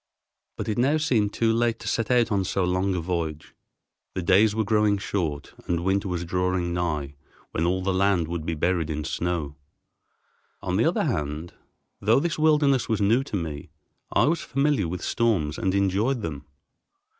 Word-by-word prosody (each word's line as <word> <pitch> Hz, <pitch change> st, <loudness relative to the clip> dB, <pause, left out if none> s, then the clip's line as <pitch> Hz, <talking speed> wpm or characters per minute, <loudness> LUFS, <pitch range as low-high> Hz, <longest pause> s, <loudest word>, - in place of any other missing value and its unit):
But -, -, -4 dB
it 110 Hz, +2 st, -1 dB
now 140 Hz, +5 st, +3 dB
seemed 115 Hz, -9 st, +1 dB
too 115 Hz, +1 st, +1 dB
late 115 Hz, 0 st, +1 dB
to 115 Hz, -, -7 dB
set 115 Hz, +1 st, -1 dB
out 120 Hz, -2 st, +3 dB
on 100 Hz, -2 st, +2 dB
so 95 Hz, +1 st, -1 dB
long 90 Hz, +2 st, 0 dB
a 90 Hz, -, -1 dB
voyage. 80 Hz, -3 st, -3 dB, 0.6 s
The 95 Hz, -, -2 dB
days 100 Hz, +4 st, +4 dB
were 110 Hz, -, +1 dB
growing 105 Hz, -1 st, +2 dB
short 85 Hz, -8 st, -3 dB
and 85 Hz, -1 st, 0 dB
winter 95 Hz, +2 st, +1 dB
was 90 Hz, -2 st, -3 dB
drawing 90 Hz, 0 st, -1 dB
nigh 75 Hz, -5 st, -2 dB, 0.4 s
when 80 Hz, -, -1 dB
all 95 Hz, +1 st, 0 dB
the 95 Hz, 0 st, 0 dB
land 95 Hz, -3 st, +2 dB
would 85 Hz, -1 st, -4 dB
be 80 Hz, +1 st, -2 dB
buried 85 Hz, 0 st, 0 dB
in 75 Hz, -1 st, -3 dB
snow. 80 Hz, -2 st, -3 dB, 1.1 s
On -, -, -1 dB
the -, -, +3 dB
other -, -, +2 dB
hand, 75 Hz, +3 st, -3 dB, 0.5 s
though 110 Hz, +5 st, +3 dB
this 165 Hz, +1 st, -2 dB
wilderness 150 Hz, -4 st, +3 dB
was 110 Hz, -2 st, +1 dB
new 110 Hz, +6 st, +3 dB
to 110 Hz, -, -5 dB
me, 80 Hz, -6 st, -4 dB, 0.4 s
I -, -, +3 dB
was 160 Hz, +2 st, +1 dB
familiar 140 Hz, -, +1 dB
with 90 Hz, +1 st, -5 dB
storms 95 Hz, -11 st, 0 dB
and 95 Hz, 0 st, 0 dB
enjoyed 100 Hz, +6 st, +1 dB
them. 75 Hz, -3 st, -5 dB
95 Hz, 180 wpm, -25 LUFS, 85-110 Hz, 1.1 s, days